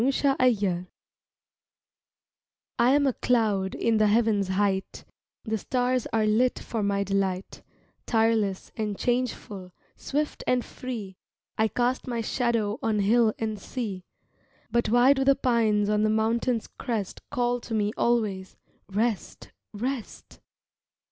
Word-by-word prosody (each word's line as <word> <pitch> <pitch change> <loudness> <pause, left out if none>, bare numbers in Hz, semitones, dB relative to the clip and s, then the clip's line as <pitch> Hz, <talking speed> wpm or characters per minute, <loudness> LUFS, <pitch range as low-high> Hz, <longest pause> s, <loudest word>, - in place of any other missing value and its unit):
THE 270 - +3 0.5
CLOUD 185 -3 -1 1.9
I 240 +1 +5
AM 290 0 +3
a 270 - +2
cloud 210 -7 +1
in 230 -1 +1
the 215 0 +4
heaven's 210 -2 +2
height, 190 0 -1 0.4
The 220 -1 -2
stars 250 +2 0
are 220 -1 +2
lit 230 +4 +2
for 225 - -4
my 200 -1 +1
delight, 195 -1 -2 0.5
Tireless 220 -4 +1
and 210 -3 -3
changeful, 220 -7 -2 0.2
swift 295 +2 -3
and 250 -1 +2
free, 215 -7 -7 0.4
I 220 - +2
cast 245 +5 -1
my 235 -2 -2
shadow 230 -1 0
on 220 -4 0
hill 215 +2 +3
and 215 -2 -3
sea 200 -4 -5 0.7
But 235 -2 +1
why 245 +4 +6
do 270 -1 0
the 275 0 +5
pines 225 -5 +2
on 210 0 +2
the 215 - +2
mountain's 225 +2 +1
crest 225 -7 -4
Call 245 0 0
to 225 - -4
me 210 0 0
always, 210 -6 0 0.3
"Rest, 215 0 -2 0.2
rest"? 240 +2 -5
220 Hz, 130 wpm, -26 LUFS, 205-245 Hz, 1.9 s, why